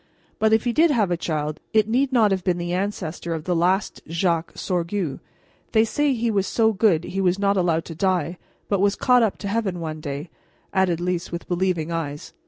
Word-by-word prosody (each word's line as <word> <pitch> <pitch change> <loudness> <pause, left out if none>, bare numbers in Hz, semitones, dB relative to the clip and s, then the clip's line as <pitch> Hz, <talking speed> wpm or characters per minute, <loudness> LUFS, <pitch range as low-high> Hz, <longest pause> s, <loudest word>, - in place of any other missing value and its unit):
But 220 0 +3
if 220 0 +4
he 240 - 0
did 325 +4 +5
have 220 -10 +2
a - - +3
child, 155 -2 -3
it 215 -1 +4
need 255 +4 +1
not 225 -5 +4
have 190 -2 0
been 180 -2 +1
the 175 0 -3
ancestor 180 -3 -3
of 155 - -5
the 180 +1 0
last 185 +4 +1
Jacques 165 0 0
Sorgue. 175 -3 -2 0.5
They 220 0 +5
say 290 +4 +1
he 235 -1 0
was 195 -2 +1
so 225 -1 +2
good 190 -5 +3
he 195 +2 -3
was 185 0 +2
not 200 0 +2
allowed 170 -3 +1
to 165 - -7
die, 175 -1 0 0.3
but 200 - +1
was 200 0 +3
caught 250 -1 +4
up 220 -4 +1
to 200 - -6
heaven 200 -4 -1
one 155 -2 -4
day," 145 +3 -5 0.4
added 190 -4 +2
Lys, 175 0 -2
with 170 0 -6
believing 175 -3 0
eyes. 150 -3 -4
185 Hz, 210 wpm, -23 LUFS, 170-210 Hz, 0.5 s, did